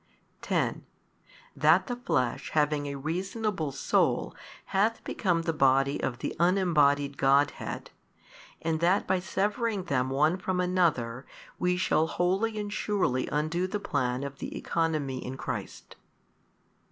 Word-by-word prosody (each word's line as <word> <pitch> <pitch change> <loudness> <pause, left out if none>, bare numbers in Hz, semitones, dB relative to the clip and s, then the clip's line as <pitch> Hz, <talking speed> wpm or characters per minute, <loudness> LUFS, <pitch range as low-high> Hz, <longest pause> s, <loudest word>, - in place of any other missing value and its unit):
|195 - - -37
10. - - 0 0.7
That 160 +5 +4
the 245 - -3
flesh 130 - -1
having 150 -1 +1
a 140 - -4
reasonable 180 +3 -2
soul 135 - +1 0.4
hath 215 +4 +2
become 175 -5 0
the 165 - 0
Body 135 -1 +3
of 120 - -2
the - - -4
unembodied 150 -6 +3
Godhead, 140 +2 +1 0.7
and 160 -1 0
that 180 +4 +2
by 190 - +1
severing 205 +2 -1
them 130 -7 0
one 150 +6 +2
from 185 -1 -2
another, 160 -10 0 0.3
we 180 0 +1
shall 160 -3 +2
wholly 195 +7 0
and 205 -1 -3
surely 190 -13 0
undo 155 +5 0
the 205 +2 -3
plan 130 -7 -1
of 140 -1 -7
the - - -5
economy 155 -6 -1
in 130 +1 -6
Christ. - - -6
160 Hz, 135 wpm, -28 LUFS, 140-185 Hz, 0.7 s, That